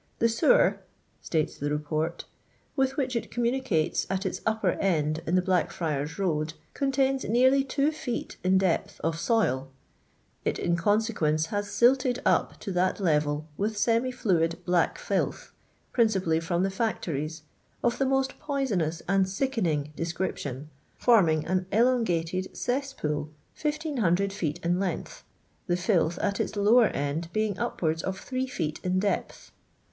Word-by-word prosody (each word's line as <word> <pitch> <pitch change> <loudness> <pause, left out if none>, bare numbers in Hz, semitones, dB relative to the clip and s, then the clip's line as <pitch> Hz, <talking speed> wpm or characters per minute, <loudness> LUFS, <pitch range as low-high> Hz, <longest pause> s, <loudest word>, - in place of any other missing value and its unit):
The 230 - +3
sewer," 230 - +4 0.4
states 155 -2 -1
the 145 - -1
K«'port, 155 +2 -2 0.2
" - - -38
with 270 -1 +1
which 260 -3 -1
it 235 - -2
communicates 240 -9 0
at 195 +1 -1
iu 190 - +1 0.2
upper 220 -4 +2
end 155 -4 +1
in 170 - +2
the 185 - +3
Blackfriars 165 -5 -1
road 160 -5 -1 0.2
contains 270 -1 +1
nearly 260 +5 +4
2 280 +2 +1
feet 290 -6 -4
in 185 +1 +4
depth 190 -3 0
of 165 0 -1
soil; 150 - +1 0.8
it - - 0
in 170 - +1
consequence 170 -5 +1
has 205 0 -1
silted 250 +2 +3
up - - +2
to 200 - -4
that 185 +2 +1
level 150 -4 +1
with 210 +1 -1
semi 230 +4 +2
fluid 165 -8 +1
black 175 -1 +2
fllth, - - -2 0.4
principally 190 -9 +2
from 170 +2 0
the 195 - 0
factories, 160 -7 -2 0.4
of 240 0 +1
the 270 - +3
most 270 0 0
poisonous 205 - -1
and 190 0 +2
sickening 185 - -1
description, 155 -4 -4 0.3
forming 170 -10 +4
an 185 0 0
don/jatcd 190 -7 +1
C(SJtpvvl 245 - -2 0.3
1500 250 - 0
feet 170 -5 -2
in 175 +1 +2
length, 190 -4 -3 0.4
the 175 - +1
filth 175 -2 +1
at 200 0 -1
its - - -2
lower 215 +3 +5
end 150 +4 -3
being 215 -1 0
upwards 160 -1 -1
of 190 0 -3
3 260 0 -3
feet 160 -12 -3
in 185 0 0
depth. 200 +1 -2
190 Hz, 145 wpm, -27 LUFS, 165-235 Hz, 0.8 s, lower